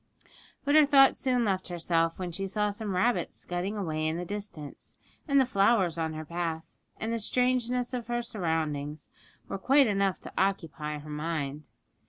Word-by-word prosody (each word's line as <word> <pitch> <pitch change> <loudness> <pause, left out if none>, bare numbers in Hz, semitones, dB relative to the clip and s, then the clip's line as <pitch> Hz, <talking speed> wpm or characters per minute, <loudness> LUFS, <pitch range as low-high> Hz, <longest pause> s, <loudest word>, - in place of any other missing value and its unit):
But 285 - +2
her 305 -1 +7
thoughts 275 -2 +6
soon 250 -3 +2
left 190 -2 0
herself 165 -1 0
when 180 -2 -4
she 195 +3 -3
saw 210 +1 0
some 205 -2 -3
rabbits 235 +7 +1
scudding 180 +4 -3
away 155 -5 -1
in 160 +1 -1
the 180 - -4
distance; 200 -7 -7 0.3
and 280 -1 +4
the 265 - +5
flowers 195 -6 +3
on 160 -1 -2
her 155 0 -6
path, 165 0 -3 0.4
and 225 +1 -2
the 230 - -1
strangeness 250 +1 +1
of 240 -2 -3
her 240 0 -1
surroundings, 160 - -2 0.4
were 195 - -4
quite 275 +6 +5
enough 195 -3 +1
to - - -9
occupy 165 -6 -1
her 150 +1 -10
mind. 150 -2 -3
190 Hz, 175 wpm, -29 LUFS, 160-235 Hz, 0.4 s, her